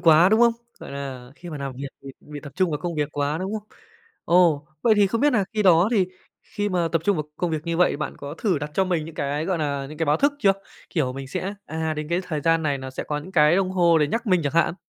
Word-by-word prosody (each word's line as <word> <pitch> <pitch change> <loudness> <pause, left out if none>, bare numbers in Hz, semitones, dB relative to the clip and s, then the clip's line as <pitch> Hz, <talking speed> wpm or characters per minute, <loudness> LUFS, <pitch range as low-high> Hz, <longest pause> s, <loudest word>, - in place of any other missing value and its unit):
quá, 165 +1 +6
đúng 220 +2 +3
không? 235 -1 +6 0.3
Gọi - - -9
là, 135 -3 -7
khi 175 +2 -10
mà 150 - -6
làm 140 -1 -4
việc 135 +2 -6 0.2
thì 135 - -8
bị 150 -1 -9
tập 140 0 -10
trung 185 -2 +2
vào 150 - -2
công 175 -1 -4
việc 150 -2 -1
quá, 145 +2 -1
đúng 190 +3 -3
không? 210 0 -19 0.6
Ồ, 165 -4 +3 0.2
vậy 225 - +5
thì 205 - +5
không 225 +4 -1
biết 295 - +4
nà 215 -5 +2
khi 215 -1 0
đó 180 0 +5
thì 200 -6 +3 0.4
khi 205 -1 -3
mà 175 -3 0
tập 165 -2 +1
trung 200 0 +2
vào 155 - -2
công 175 - -1
việc 155 -1 -3
như 170 0 -1
vậy 180 - +4
thì - - -3
bạn 150 - -4
có 145 +1 -7
thử 190 -8 +1
đặt 145 +1 -5
cho 190 - +3
mình 175 -4 -1
những 160 0 -9
cái, 145 +1 -2
gọi 180 -1 -1
nà, 140 -3 -2
những 155 +1 -10
cái 165 - 0
báo 145 +1 +3
thức 285 +1 +2
chưa? 195 -8 +4 0.4
Kiểu, 135 -7 0
mình 135 0 -7
sẽ, 195 +7 -3
à, 160 0 -2
đến 150 0 -5
cái 175 +2 +1
thời 160 -5 -3
gian 165 +2 +2
này 145 -2 0
nó 130 0 -7
sẽ 130 - -5
có 150 - -2
những 170 +6 -10
cái 155 +1 +5
đồng 190 -1 +1
hồ 170 -3 +4
để 150 - +3
nhắc 230 - -2
mình 185 -4 +3
chẳng 145 - -1
hạn? 170 0 +2
165 Hz, 300 wpm, -24 LUFS, 145-185 Hz, 0.6 s, quá